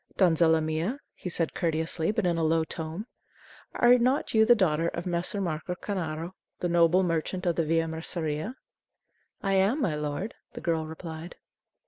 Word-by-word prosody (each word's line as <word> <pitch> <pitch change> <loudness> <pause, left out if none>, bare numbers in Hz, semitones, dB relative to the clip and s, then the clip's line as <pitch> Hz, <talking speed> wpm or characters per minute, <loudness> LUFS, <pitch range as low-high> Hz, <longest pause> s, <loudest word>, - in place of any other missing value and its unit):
"Donzella 165 -3 +5
mia," 160 - -1 0.2
he 180 - -6
said 165 -1 -1
courteously, 160 -1 -1
but 215 -1 0
in 175 -1 +2
a - - +1
low 160 0 +3
tone; 160 +5 -5 0.7
"are 245 +1 +6
not 255 +4 +1
you 220 -1 +6
the 240 - +8
daughter 165 -6 +2
of 170 0 -4
Messer. 175 +3 -1
Marco 180 -1 -2
Cornaro, 170 -4 -4 0.3
the 175 - 0
noble 175 +2 +4
merchant 175 +2 -1
of 170 -2 +2
the 165 - +1
Via 165 +1 +1
Merceria?" 160 - -3 0.9
"I 195 -1 +1
am, 195 +9 +3
my 195 - +1
lord," 150 +8 -3 0.2
the - - -7
girl 160 -2 0
replied. 160 +1 -8
170 Hz, 165 wpm, -28 LUFS, 160-190 Hz, 0.9 s, the